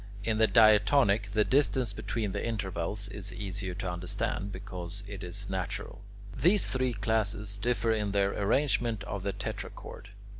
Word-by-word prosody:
In 110 0 0
the 110 - +6
diatonic, 110 -1 +5
the 105 0 +4
distance 130 -3 +2
between 105 0 -2
the - - -3
intervals 100 -3 -2
is 100 -1 -6
easier 95 -2 -4
to 95 -1 -3
understand, 90 +3 -3
because 95 0 -6
it 100 -2 -7
is 100 +3 -3
natural. 95 +1 -4 0.3
These 190 +4 +4
three 130 -1 0
classes 105 -1 0
differ 115 +2 0
in 105 -2 0
their 100 0 +2
arrangement 115 0 +1
of 100 - -4
the 100 +1 -1
tetrachord. 100 - -7
100 Hz, 150 wpm, -30 LUFS, 95-110 Hz, 0.3 s, the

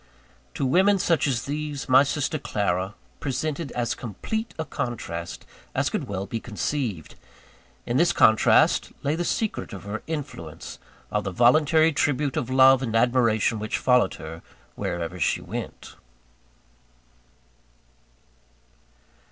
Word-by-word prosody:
To 140 - -1
women 190 +9 +4
such 165 -5 +1
as 125 -4 0
these, 145 0 -4
my 130 +1 +7
sister 145 +2 -1
Clara 95 -5 -1 0.2
presented 145 +1 -3
as 120 -1 -1
complete 220 - -4
a 160 - -3
contrast 90 - -5 0.3
as - - +1
could - - -2
well 100 -1 -3
be 115 +1 -4
conceived. 110 - -3 0.7
In 120 - 0
this 170 +3 +4
contrast 110 -9 +4
lay 145 - +1
the 175 - -1
secret 215 - -2
of 100 - -8
her 100 +2 -5
influence, 135 - -6 0.3
of 105 - 0
the 95 - -3
voluntary 155 - +4
tribute 145 -2 0
of 125 - -2
love 130 0 +6
and 115 -4 -2
admiration 115 -2 +2
which 110 +1 -2
followed 125 -6 +3
her 80 +1 -9 0.3
wherever 85 0 -4
she - - +1
went. - - -7
125 Hz, 125 wpm, -25 LUFS, 105-150 Hz, 0.7 s, my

